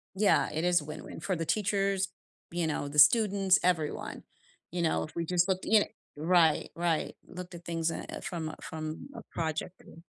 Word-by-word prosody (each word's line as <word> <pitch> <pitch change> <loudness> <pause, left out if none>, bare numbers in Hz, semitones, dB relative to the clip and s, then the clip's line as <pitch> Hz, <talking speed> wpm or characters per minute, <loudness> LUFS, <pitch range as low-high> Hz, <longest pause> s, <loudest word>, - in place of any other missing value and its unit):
Yeah, 205 0 +3
it 160 +2 -2
is 175 -3 +3
win-win, 150 +1 -8
for 185 +1 -1
the 165 0 -2
teachers, 195 -1 +1 0.4
you 170 -2 0
know, 145 -2 -2
the 150 +1 0
students, 195 +3 +6
everyone. 165 -4 -1 0.5
You 175 0 -2
know, 160 - +1
if 155 - -9
we 170 - -1
just 180 +1 +2
looked 190 -1 0
y 215 -2 +5 0.3
Right, 165 0 +3
right, 170 -2 0
looked 180 0 -8
at 170 - -10
things, 165 -1 -1
uh, 165 - -4
uh, - - -5
from 160 -3 -4
from 155 - -6
a - - -7
project 165 +2 -3
view. 165 +1 -15
170 Hz, 185 wpm, -30 LUFS, 160-185 Hz, 0.5 s, students